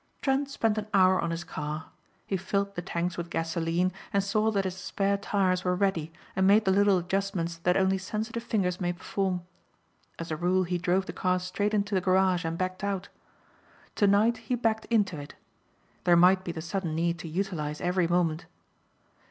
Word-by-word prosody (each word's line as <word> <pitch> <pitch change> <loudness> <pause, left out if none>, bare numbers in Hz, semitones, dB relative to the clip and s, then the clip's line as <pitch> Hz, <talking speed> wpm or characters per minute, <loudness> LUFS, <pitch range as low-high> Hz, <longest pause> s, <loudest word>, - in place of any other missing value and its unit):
Trent 275 0 +1
spent 225 -5 0
an 210 - -6
hour 185 -1 +5
on 170 - -1
his 165 0 -3
car. 150 -1 -5 0.3
He 195 - -2
filled 200 +2 -1
the 175 - -4
tanks 175 0 -3
with 170 0 -5
gasoline 165 +2 0 0.2
and 200 -1 +2
saw 215 +2 +1
that 200 -3 +1
his 185 -1 -3
spare 195 +1 -1
tires 195 -2 0
were 180 0 +1
ready 180 -5 0 0.2
and 190 0 +3
made 210 +2 +5
the 190 - +4
little 200 0 +4
adjustments 180 -2 -2
that 180 +2 +1
only 190 0 +2
sensitive 220 +5 -4
fingers 190 -6 -1
may 175 0 0
perform. 185 0 -2 0.7
As 165 -1 -6
a - - 0
rule 180 +3 +2
he 175 0 -2
drove 180 +2 +1
the - - -6
car 185 0 +1
straight 205 +4 -1
into 205 0 0
the 190 - +2
garage 185 -1 +3
and 165 +1 -2
backed 185 +1 -3
out. 200 -1 -2 0.8
Tonight 205 +3 +3
he 250 - -2
backed 225 -2 0
into 205 -8 +1
it. 145 - -10 0.7
There 175 -1 +6
might 185 +2 +5
be 175 - -3
the 160 -1 -6
sudden 170 -2 -3
need 170 +1 0
to - - -7
utilize 160 -4 -3
every 180 -1 +1
moment. 165 -2 0
185 Hz, 190 wpm, -28 LUFS, 175-200 Hz, 0.8 s, There